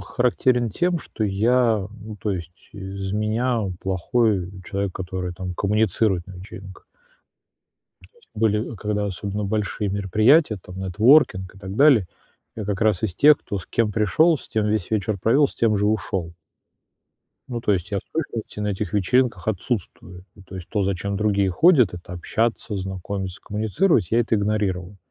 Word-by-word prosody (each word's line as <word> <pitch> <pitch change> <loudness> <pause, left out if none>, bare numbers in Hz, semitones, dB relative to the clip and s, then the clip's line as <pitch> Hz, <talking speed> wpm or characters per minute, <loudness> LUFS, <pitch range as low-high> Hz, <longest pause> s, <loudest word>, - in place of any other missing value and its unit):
х - - -13
характерен 125 -1 +2
тем, 175 - 0
что 110 - -4
я, 110 +1 +2
ну, 105 0 -8
то 105 +1 -3
есть, 85 -1 -8
из 95 -1 -6
меня, 110 +3 0
э, - - -4
плохой, 95 +1 0
э, - - -10
человек, 100 -1 -3
который 90 -1 -4
там 90 0 -5
коммуницирует 100 -2 +1
на 95 - -10
вечеринках. 95 +1 -11 1.3
То 475 - -27
есть 470 - -27
были, 110 +1 0
э, - - -8
когда 105 0 -2
особенно 100 +2 -4
большие 105 0 -2
мероприятия, 110 - +3
там, 90 +1 -10
нетворкинг 95 - +3
и - - -15
так 95 0 -7
далее, 135 -9 +5 0.5
я 110 - -4
как 105 +1 -3
раз 110 -4 +2
из 100 -6 -1
тех, 150 +5 +6
кто 100 - -5
с 90 - -10
кем 115 -2 0
пришёл, 130 - +3
с - - -13
тем 110 -1 0
весь 105 -3 -1
вечер 105 -1 -1
провёл, 135 +9 +3
с - - -14
тем 110 -2 +2
же 105 +1 +1
ушёл. 95 -5 -2 1.1
Ну, 120 -2 -4
то 105 - +1
есть 95 +1 -2
я 100 - 0
в - - -8
точности 120 -9 -4
на 105 - -1
этих 100 -2 -3
вечеринках 120 +4 +1
отсутствую. 95 -3 -4
Ну, 100 - -16
то 95 - -11
есть 90 -2 -8
то, 105 -3 0
за 100 - 0
чем 100 +3 -3
другие 100 -2 +1
ходят- 130 - +5
это 90 0 -10
общаться, 110 +4 -2
знакомиться, 95 0 -5
коммуницировать- 110 - +1
я 115 - +3
это 115 -1 0
игнорировал. 100 -2 -1
105 Hz, 180 wpm, -23 LUFS, 95-115 Hz, 1.3 s, тех